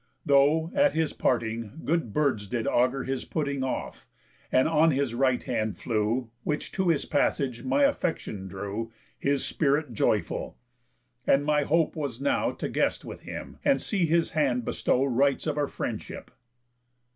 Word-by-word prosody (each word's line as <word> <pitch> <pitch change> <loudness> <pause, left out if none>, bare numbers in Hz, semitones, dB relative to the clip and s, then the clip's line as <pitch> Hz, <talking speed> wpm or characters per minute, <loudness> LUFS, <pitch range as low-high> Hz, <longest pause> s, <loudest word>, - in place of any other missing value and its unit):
Though, 145 +4 +4
at 285 0 +4
his 160 -1 0
parting, 115 +2 -1
good 160 -7 0
birds 130 -7 0
did 115 +2 -2
augur 125 +2 +2
His 135 0 -3
putting 140 -4 -2
off, 130 - -4 0.4
and 130 - +4
on 160 0 +4
his 140 -4 0
right 130 0 +1
hand 110 -3 -2
flew, 115 +1 -1
Which 150 +4 -3
to 190 -2 0
his 160 -4 +2
passage 130 -4 0
my 280 - +2
affection 165 - -1
drew, 100 +4 -5 0.3
His 140 0 +1
spirit 145 -3 0
joyful; - - 0 0.7
and 140 +1 +4
my 150 -1 +3
hope 165 +1 +2
was 140 -6 -4
now 140 - +1
To - - -4
guest - - 0
with - - -8
him, - - -8
and 280 -2 +3
see 190 -6 0
his 170 +1 +2
hand 135 -6 +1
bestow 125 - +1
Rites 135 +1 +2
of 155 -2 -1
our 145 -1 0
friendship." - - -6
140 Hz, 155 wpm, -27 LUFS, 120-155 Hz, 0.7 s, Though